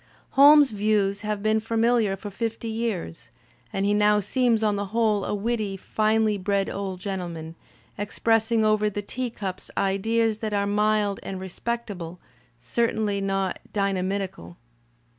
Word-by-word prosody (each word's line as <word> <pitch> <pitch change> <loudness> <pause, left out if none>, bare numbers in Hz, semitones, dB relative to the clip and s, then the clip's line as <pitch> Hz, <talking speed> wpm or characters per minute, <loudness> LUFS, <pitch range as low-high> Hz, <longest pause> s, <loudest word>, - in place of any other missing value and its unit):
Holmes's 290 0 +7
views 205 -1 +1
have 210 -1 -3
been 215 0 +3
familiar 225 -2 +1
for 205 +1 -7
fifty 230 +2 -3
years, 220 - -3 0.4
and 195 0 -1
he 205 - +2
now 210 0 +4
seems 230 +1 +1
on 210 -1 +2
the 200 0 -3
whole 215 -3 +2
a - - -2
witty, 210 -2 -2
finely 215 +1 +1
bred 195 +1 0
old 195 -2 -4
gentleman, 175 -5 -5 0.5
expressing 225 +2 +1
over 215 0 +3
the 205 0 -4
teacups 210 -4 -5
ideas 220 +3 +1
that 215 -2 -3
are 200 0 +1
mild 210 0 +1
and 190 -1 -6
respect 230 +5 -4
able, 175 -2 -7 0.4
certainly 210 - -1
not 195 -1 -1
dynamitical. 190 - -2
210 Hz, 140 wpm, -25 LUFS, 195-225 Hz, 0.5 s, Holmes's